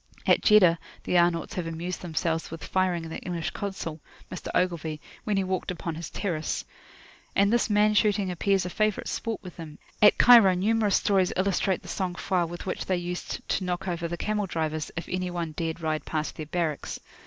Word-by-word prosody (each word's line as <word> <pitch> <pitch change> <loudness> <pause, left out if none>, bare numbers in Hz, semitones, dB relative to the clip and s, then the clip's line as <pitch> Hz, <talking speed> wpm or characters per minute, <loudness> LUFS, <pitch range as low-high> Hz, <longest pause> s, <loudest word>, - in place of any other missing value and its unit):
At - - +4
Jeddah 185 -6 +6 0.2
the - - -1
Arnauts 170 +1 +1
have 180 -5 -3
amused 170 +2 -4
themselves 165 -1 -1
with 165 -1 -8
firing 185 -3 0
at 165 - -7
the - - -4
English 170 -2 -3
Consul, 190 -6 -5 0.3
Mr. 185 - -6
Ogilvie, 165 -4 0 0.3
when 210 -2 +1
he 195 - +2
walked 185 -1 -2
upon 170 -2 -3
his 160 0 -6
terrace. 160 - -2 0.7
And 200 +2 +4
this 240 -1 +2
man 210 0 +4
shooting 205 -3 +2
appears 190 +2 +1
a 180 - -4
favourite 215 0 0
sport 225 -2 -3
with 180 -2 -10
them: 155 -3 -9 0.2
at 210 - +7
Cairo 230 -7 +8
numerous 210 +2 +2
stories 190 -3 +2
illustrate 190 0 +1
the - - -11
sang 185 -2 -2
froid 175 -2 0
with 175 +1 -7
which 185 - -3
they 185 - +1
used 175 0 -5
to - - 0
knock 180 +1 -3
over 170 -1 -2
the 170 +1 -4
camel 210 0 -1
drivers, 155 -2 -2
if 165 - -4
any 180 0 -2
one 170 -2 -3
dared 160 +1 -3
to 165 - -14
ride 155 -1 -1
past 155 -2 -3
their 155 - -6
barracks. 160 -3 -2
180 Hz, 200 wpm, -27 LUFS, 165-195 Hz, 0.7 s, Cairo